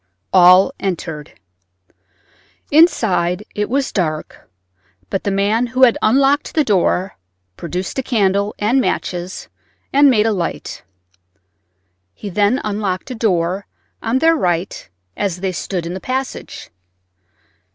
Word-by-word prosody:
All 185 +6 +6
entered. 160 -5 -4 1.4
Inside 210 - +3
it 210 0 -2
was 275 +2 0
dark, 155 -5 -3 0.6
but 195 - -2
the - - +1
man 205 +5 +1
who 255 +2 +1
had 240 -3 +6
unlocked 275 +5 +2
the 310 - +3
door 190 -3 0 0.4
produced 180 +8 -4
a - - +1
candle 200 -4 0
and 235 +6 +2
matches 180 -5 -3 0.5
and 285 +1 +6
made 220 -4 +3
a 225 - +2
light. 175 -4 -4 1.3
He 205 - -7
then 205 +7 +2
unlocked 205 +1 -3
a - - -4
door 190 -3 -1 0.3
on 230 +3 0
their 325 +4 +4
right 180 - -2 0.3
as 195 -4 -2
they 190 -1 -1
stood 175 +1 -4
in 170 - -4
the 190 - -5
passage. 260 +5 -5
200 Hz, 125 wpm, -18 LUFS, 180-250 Hz, 1.4 s, All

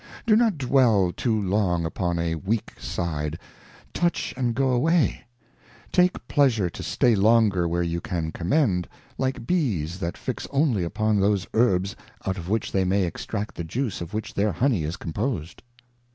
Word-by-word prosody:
Do 220 -3 +5
not 220 -6 +3
dwell 120 -9 +3
too 110 -3 0
long 95 -4 +1
upon 85 +1 -1
a 85 0 0
weak 100 +7 -2
Side, 75 -2 -3 0.6
touch 175 0 0
and 120 -3 -1
go 135 -1 +2
away; 155 +6 +2 0.7
take 180 0 +2
pleasure 115 - +2
to - - -8
stay 120 - +2
longer 105 -4 +4
where 85 +1 0
you 85 0 -2
can 80 -3 -3
commend, 90 - +1 0.3
like 130 -3 -1
Bees 95 - 0
that 85 -2 -3
fix - - -4
only 135 - +1
upon 110 +4 0
those 100 -1 +2
Herbs 100 -5 +2 0.3
out 95 0 -1
of 85 +1 -7
which 110 +1 -1
they 95 - +2
may 95 +2 +2
extract 100 +4 -4
the 85 - -5
Juice 115 - -3
of 85 0 -6
which 110 0 -4
their 100 0 +1
Honey 110 - +1
is 80 +4 -4
composed. 90 - -3
100 Hz, 165 wpm, -25 LUFS, 85-125 Hz, 0.7 s, Do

